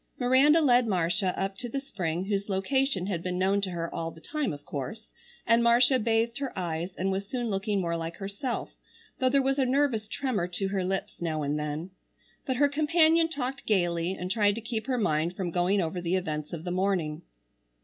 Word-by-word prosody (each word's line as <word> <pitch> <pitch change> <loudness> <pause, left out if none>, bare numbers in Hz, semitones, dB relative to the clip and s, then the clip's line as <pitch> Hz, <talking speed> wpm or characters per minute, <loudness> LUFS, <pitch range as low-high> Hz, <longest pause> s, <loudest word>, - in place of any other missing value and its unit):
Miranda 275 +5 +5
led 250 -4 +4
Marcia 180 0 +1
up 195 0 -1
to 245 -1 -4
the 275 - -2
spring 180 - -3
whose 200 0 -2
location 200 +1 +1
had 185 -4 -2
been 180 0 -3
known 195 +2 +2
to 195 - -2
her 170 -2 -3
all 165 0 -3
the 165 - -13
time 300 - -2
of 145 -1 -8
course, 145 - -5 0.4
and 230 +1 +4
Marcia 245 +3 +5
bathed 230 +2 +1
her 275 -2 -3
eyes 175 0 -3
and 190 +2 0
was 195 +1 -2
soon 240 -2 -2
looking 200 +1 0
more 170 -2 -1
like 165 0 -4
herself, 200 +6 -4 0.5
though 260 - +3
there 275 +1 +3
was 270 +1 +1
a - - +4
nervous 255 -4 +1
tremor 245 -11 -1
to 195 +2 -2
her 195 -1 -1
lips 190 0 -3
now 155 -3 -1
and 145 +1 -1
then. 150 +4 -4 0.6
But 260 - +1
her 285 +3 +4
companion 320 +3 +3
talked 270 -3 -4
gaily, 175 -3 +1
and 185 -1 -4
tried 205 -1 +3
to 230 - -5
keep 225 -1 -4
her 255 -2 0
mind 165 -4 0
from 180 -3 -3
going 180 +4 +2
over 175 +1 -2
the 175 +1 0
events 155 -5 -3
of 165 -2 -5
the 175 - -3
morning. 180 -4 0
195 Hz, 210 wpm, -28 LUFS, 175-250 Hz, 0.6 s, Miranda